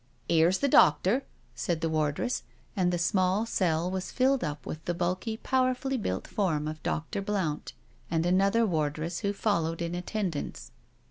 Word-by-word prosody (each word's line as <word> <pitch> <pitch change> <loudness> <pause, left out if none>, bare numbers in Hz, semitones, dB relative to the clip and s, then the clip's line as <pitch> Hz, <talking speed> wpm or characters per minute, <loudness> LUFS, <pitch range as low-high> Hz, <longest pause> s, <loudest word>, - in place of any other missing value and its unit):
" - - -36
Here's 170 +3 +4
the 280 - +1
doctor," 195 - +4 0.3
said 170 -4 -2
the 165 - +1
wardress, 155 - 0 0.3
and 180 -3 +2
the 175 - 0
small 185 +3 +2
cell 175 -5 0
was 190 -1 -3
filled 265 +1 +2
up 150 -2 -4
with 155 0 -6
the 175 - -1
bulky, 185 +6 -1
powerfully 260 +2 0
built 95 - -2
form 160 -7 0
of 155 0 -5
Dr. 160 +6 -2
Blount 195 -7 -2 0.4
and 165 0 +1
another 195 +5 +3
wardress 160 -1 -1
who 200 - 0
followed 170 -6 0
in 170 0 -2
attendance. 180 -3 -3
180 Hz, 160 wpm, -29 LUFS, 160-205 Hz, 0.4 s, Here's